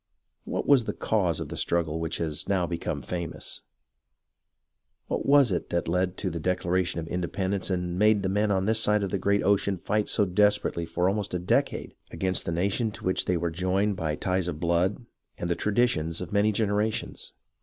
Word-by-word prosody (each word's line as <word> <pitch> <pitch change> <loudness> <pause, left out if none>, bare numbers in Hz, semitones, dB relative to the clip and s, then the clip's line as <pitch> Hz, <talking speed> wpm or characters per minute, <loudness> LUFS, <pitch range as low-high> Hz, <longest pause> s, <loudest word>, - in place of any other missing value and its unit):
What - - -2
was 135 -5 +5
the - - -2
cause 90 -8 0
of - - -5
the - - -5
struggle 80 -2 0
which 80 0 -2
has 80 -1 -3
now 95 -3 +2
become 85 -5 -3
famous? 85 +4 -6 1.4
What - - -3
was 140 -5 +6
it 90 - -2
that 85 -1 -1
led 90 +2 0
to 95 - -2
the 85 - -4
Declaration 90 0 0
of 80 - -5
Inde 90 0 -3
pendence 95 0 -1
and 90 -1 -2
made 105 -1 +4
the - - +1
men 105 +2 +1
on 95 -1 +1
this 110 +1 +2
side 105 -1 +3
of 95 - -3
the 100 - 0
great 100 +1 +2
ocean 100 -1 +2
fight 105 +4 -1
so 105 - +3
desperately 105 -3 +1
for 90 +2 0
almost 100 -1 -1
a - - +2
decade 90 - 0 0.2
against 95 +2 -1
the - - 0
nation 100 +7 0
to 110 +1 -10
which 95 - +1
they 90 - +1
were 85 0 -1
joined 95 +4 0
by 80 -4 -2
ties 90 +2 -1
of 80 -3 -4
blood 90 +7 0 0.3
and 85 - -3
the - - +2
traditions 100 -8 +1
of 90 +1 -6
many 105 +1 +3
generations 105 +1 -1
95 Hz, 200 wpm, -27 LUFS, 85-105 Hz, 1.4 s, was